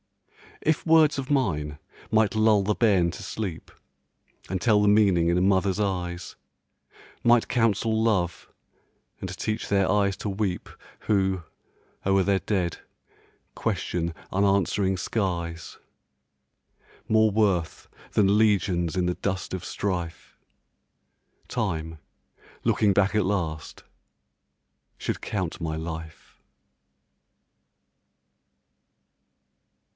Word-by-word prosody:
If 155 0 0
words 160 -2 +5
of 135 -1 -4
mine 75 - 0 0.3
might 110 0 +3
lull 110 -1 +4
the 105 +2 +1
bairn 95 -7 +3
to - - -9
sleep, 95 -7 -5 0.8
And 95 0 -1
tell 105 0 +4
the 105 - +3
meaning 100 -5 +4
in 85 - +2
a - - +2
mother's 95 +1 +2
eyes; 90 -3 -3 0.9
Might 120 -1 +4
counsel 110 -2 +1
love, 90 -7 0 0.7
and - - -5
teach 110 +1 -3
their 100 -2 +2
eyes 100 -1 +2
to 105 - -4
weep 95 -2 -2 0.3
Who, 95 -3 +1 0.6
o'er 95 0 +3
their 100 0 +2
dead, 90 -6 -1 0.8
question 85 -1 -2 0.2
unanswering 95 0 +1
skies, 85 -5 -3 1.3
More 110 0 +4
worth 100 -6 0 0.3
than 100 0 +4
legions 95 -6 +2
in 90 -1 +1
the 90 - 0
dust 95 -2 -3
of 90 - -6
strife, 90 -4 -4 1.1
Time, 80 0 -3 0.6
looking 105 -2 +3
back 100 +1 +2
at 105 -3 +2
last, 80 -7 -3 1.1
should - - -3
count 95 -5 -3
my 80 -1 -2
life. 80 0 -8
95 Hz, 105 wpm, -26 LUFS, 85-105 Hz, 1.3 s, words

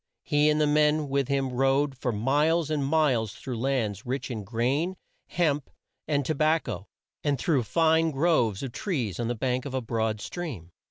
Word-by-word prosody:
He 150 +1 +3
and 150 0 +2
the 155 - +4
men 150 0 +2
with 140 -1 +1
him 135 -2 0
rode 135 +2 +2
for 125 -1 -2
miles 145 +8 +1
and 150 -2 0
miles 135 -7 +2
through 125 -4 -5
lands 115 -6 -1
rich 130 +1 -3
in 110 -3 -4
grain, 130 - 0 0.3
hemp, 150 -5 0 0.4
and 145 -3 +1
to 155 - 0
bac 155 +2 +2
co, 90 +3 -6 0.4
and 145 -2 +1
through 140 +1 +1
fine 160 +6 +3
groves 135 - +1
of 135 - -4
trees 125 - -3
on 120 - -1
the 120 - -1
bank 125 +2 -1
of 135 -2 -5
a - - +1
broad 110 -2 -1
stream. 110 - -6
135 Hz, 185 wpm, -27 LUFS, 120-150 Hz, 0.4 s, the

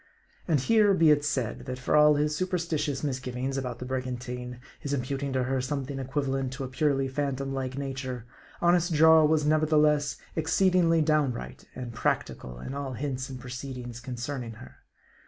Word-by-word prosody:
And 160 -5 +3
here 210 - +4
be 165 -3 +5
it 145 -1 +3
said, 130 -3 -2
that 130 0 -3
for 125 +4 0
all 150 0 +7
his 150 +1 +1
superstitious 165 -5 -1
misgiv 130 -3 -3
ings 130 +2 -2
about 125 -3 -3
the 125 - -7
brigantine; 125 -1 -4 0.2
his 145 -2 -4
imputing 135 +1 -2
to 130 -1 +1
her 130 +1 0
something 135 +1 -3
equivalent 135 -1 -2
to 135 +1 -5
a - - -3
purely 135 0 +1
phantom 135 0 -2
like 130 -1 -3
nature, 130 -3 -4 0.4
honest 175 0 +3
Jarl 160 0 +7
was 155 -1 +2
nevertheless 150 -2 +3 0.2
exceedingly 165 0 +3
downright 150 -5 -1
and 125 -2 -6
practical 60 - -2
in 130 - -6
all 140 -2 -4
hints 130 +1 -3
and 130 -1 -7
proceedings 125 -1 -7
concerning 120 0 -5
her. 65 -11 -13
135 Hz, 165 wpm, -28 LUFS, 125-150 Hz, 0.4 s, all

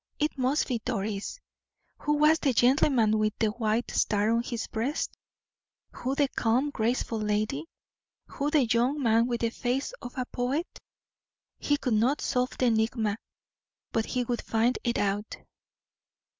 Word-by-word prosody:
It 300 +1 0
must 265 +2 +1
be 240 -4 -2
Doris. 210 - -3 0.6
Who 295 - 0
was 305 +2 +4
the 275 -4 +1
gentleman 240 -3 +3
with 215 0 0
the 220 - +2
white 220 +1 -1
star 210 +1 +2
on 230 0 +2
his 235 -1 -4
breast? 245 +8 -2 0.8
Who 260 +2 -3
the 285 0 +3
calm, 250 +5 +1
graceful 230 -1 -1
lady? 210 -8 -1 0.6
Who 285 +1 -3
the 295 -4 +3
young 240 +6 +1
man 230 0 +4
with 240 -1 -2
the 230 -1 +1
face 255 - -2
of 245 - -9
a 255 - -1
poet? 260 +7 -1 0.9
He 290 - +1
could 255 -4 -1
not 240 +7 +2
solve 250 -1 -1
the 255 - +1
enigma, 220 -2 +1 0.7
but 225 -1 0
he 250 -1 -1
would 240 0 -2
find 230 +3 +1
it 235 -1 0
out. 205 +1 -1
240 Hz, 155 wpm, -28 LUFS, 220-265 Hz, 0.9 s, was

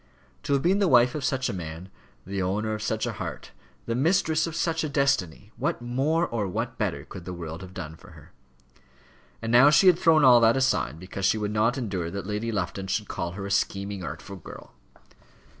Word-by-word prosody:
To 145 -1 -1
have 140 - +1
been 190 +4 +3
the 200 - +3
wife 125 -4 +5
of 150 - -4
such 130 0 0
a - - -3
man, 85 0 -7 0.4
the 95 0 -3
owner 105 +4 -1
of 105 - -4
such 110 0 -1
a - - -2
heart, - - -7 0.3
the 115 - -2
mistress 160 +3 +2
of 165 - -6
such 165 -1 0
a 155 - -2
destiny 140 - 0
what - - -1
more 135 +8 0
or 110 -8 -2
what 90 - -4
better - - -2
could 90 - -10
the 90 - -6
world 85 -1 -7
have 95 0 -11
done 80 0 -6
for - - -16
her? - - -16 1.1
And 115 - -2
now 125 +4 +7
she 150 +6 +5
had 180 -2 +6
thrown 160 -2 +5
all 125 -2 +8
that 115 +2 +5
aside 80 - 0
because 95 +2 -5
she - - +2
would 105 -1 -2
not 115 +4 +2
endure 95 -9 -3
that 100 0 -5
Lady 105 +3 -3
Lufton 95 -1 -3
should 105 +2 -1
call 85 0 -4
her 100 +1 -6
a 100 - -5
scheming, 100 0 -1
artful 85 +5 -7
girl! 85 - -12
110 Hz, 215 wpm, -26 LUFS, 95-140 Hz, 1.1 s, all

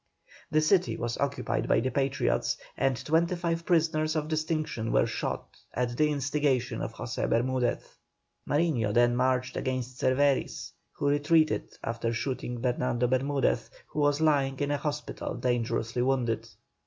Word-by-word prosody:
The 155 0 +3
city 180 +4 +2
was 120 0 -2
occupied 140 0 -1
by - - +4
the 130 +2 -1
Patriots, 135 -1 0 0.2
and 135 -1 +1
twenty 170 +3 +2
five 170 -1 -2
prisoners 160 -2 +2
of 155 0 -1
distinction 155 -7 -1
were - - +4
shot, - - -4 0.2
at 120 -1 -1
the 150 +4 +3
instigation 140 -4 0
of - - -4
José - - -3
Bermudez. 125 +1 0 0.6
Mariño 145 -10 +1
then 120 0 +4
marched 130 0 +1
against 130 -1 -3
Cervéris, 135 +1 +1 0.2
who 145 - -2
retreated, 145 -4 +2
after 115 0 -2
shooting 125 0 -3
Bernardo 125 -1 0
Bermudez, 135 +3 +1 0.2
who - - -4
was 145 0 +3
lying 140 -4 +2
in 145 0 0
a 145 - +1
hospital 150 0 -4
dangerously 120 -1 -1
wounded. 125 -3 0
135 Hz, 140 wpm, -28 LUFS, 125-150 Hz, 0.6 s, by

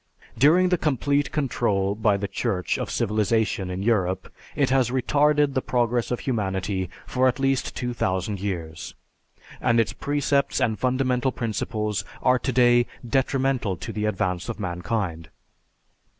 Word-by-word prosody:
During 165 +9 +5
the 180 - +1
complete 145 -1 +1
control 105 -9 0
by 105 -1 +2
the 100 0 -3
Church 90 -1 -1
of - - -3
civilization 105 -2 0
in 90 +1 -4
Europe, 95 -4 0 0.2
it 140 -3 +1
has 130 -3 +3
retarded 145 +3 +2
the 130 - 0
progress 120 -1 0
of 125 - -2
humanity 95 -5 -2 0.2
for 130 0 +2
at 125 - +1
least 135 -2 0
2000 100 -5 -2
years, 85 -5 -5 0.7
and 115 -1 +3
its 115 - +1
precepts 145 -1 0
and 110 -2 0
fundamental 130 0 +1
principles 110 -3 -2 0.2
are 125 0 +4
today 120 -1 +3 0.2
detrimental 130 -5 0
to 115 0 -6
the 105 0 -2
advance 95 -2 -1
of 110 -3 -5
mankind. 90 -3 -3
115 Hz, 135 wpm, -24 LUFS, 100-130 Hz, 0.7 s, During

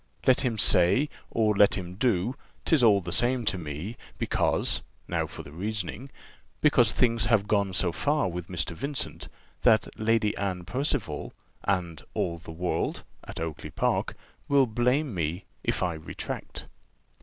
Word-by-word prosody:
Let 130 - +5
him 120 -4 -1
say, 115 +9 +5 0.2
or 110 -2 +2
let 100 0 +5
him 90 -2 -5
do, 105 +1 +1 0.3
'tis 160 -5 +4
all 105 -4 +5
the 85 0 -6
same 120 +4 +2
to - - +2
me 80 +8 -6 0.2
because - - +1 0.3
(now - - -1
for - - -9
the 70 - -12
reasoning) 105 - -3 0.5
because 125 -7 +5
things 115 -3 +2
have 105 -2 +3
gone 100 -2 +2
so 90 -1 +2
far 145 - +1
with 90 -1 -5
Mr. 90 -4 -2
Vincent, 140 - -4 0.3
that 110 -1 +4
Lady 110 -1 +2
Anne 95 -3 -2
Percival 125 - -2 0.3
and 90 -5 -1
all 85 -1 -1
the 80 - -13
world 90 +2 -2 0.2
(at - - -7
Oakly 80 -2 -5
park) - - 0 0.3
will 140 -1 +5
blame 125 +4 +1
me, 85 +1 -2 0.2
if - - 0
I 90 -2 0
retract. 80 -1 -6
105 Hz, 155 wpm, -27 LUFS, 90-120 Hz, 0.5 s, Let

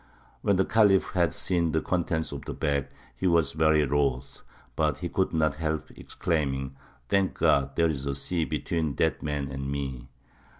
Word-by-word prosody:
When 100 - +2
the 95 0 +2
Khalif 100 -3 +4
had 85 -4 +2
seen 85 -4 0
the 80 - +2
contents 85 -3 -1
of 70 -2 -7
the - - -5
bag, 70 -2 0 0.3
he 95 - -1
was 85 -5 +3
very 80 -1 +3
wroth; 70 -2 -1 0.3
but 75 -2 +1
he 90 - -4
could 95 +2 0
not 80 -3 +2
help 80 -1 -2
exclaiming, 70 -5 -2 0.3
"Thank 100 -1 +2
God 70 0 +2
there 85 -1 +3
is 70 -2 -4
a 70 - -1
sea 85 +4 -1
between 80 -5 -2
that - - +1
man 75 -2 -3
and 70 0 -4
me!" 65 -3 -4
75 Hz, 175 wpm, -27 LUFS, 70-85 Hz, 0.3 s, Khalif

